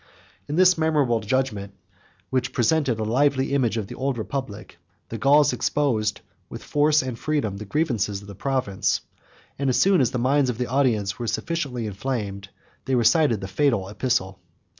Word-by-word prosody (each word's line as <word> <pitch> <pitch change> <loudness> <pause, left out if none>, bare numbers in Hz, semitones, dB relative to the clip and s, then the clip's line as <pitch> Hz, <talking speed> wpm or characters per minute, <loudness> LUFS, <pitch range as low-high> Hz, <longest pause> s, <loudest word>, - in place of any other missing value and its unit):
In 145 - -3
this 185 -1 +5
memorable 145 -7 +2
judgment, 105 -3 -2 0.6
which 130 -1 -1
presented 130 -1 +1
a - - -1
lively 135 +4 +1
image 120 -5 +1
of 110 - -2
the - - -9
old 135 -1 -2
republic, 110 -6 -6 0.3
the 115 - -5
Gauls 145 +4 +4
exposed, 110 -8 0 0.3
with - - -8
force 150 0 +2
and 125 -3 -5
freedom, 140 -10 -1
the 105 - -7
grievances 110 -7 -1
of 100 - -14
the 100 - -9
province; 125 -3 -1 0.6
and 140 -1 0
as 125 - +2
soon 195 -4 +4
as 125 - +2
the 125 - -3
minds 130 +2 +2
of 120 - -3
the 125 - -1
audience 120 -6 0
were 120 - -3
sufficiently 140 -6 -2
inflamed, 100 -2 -4 0.4
they 135 - 0
recited 120 0 +3
the 95 - -5
fatal 105 -1 +1
epistle. 105 -3 -1
125 Hz, 170 wpm, -24 LUFS, 105-140 Hz, 0.6 s, this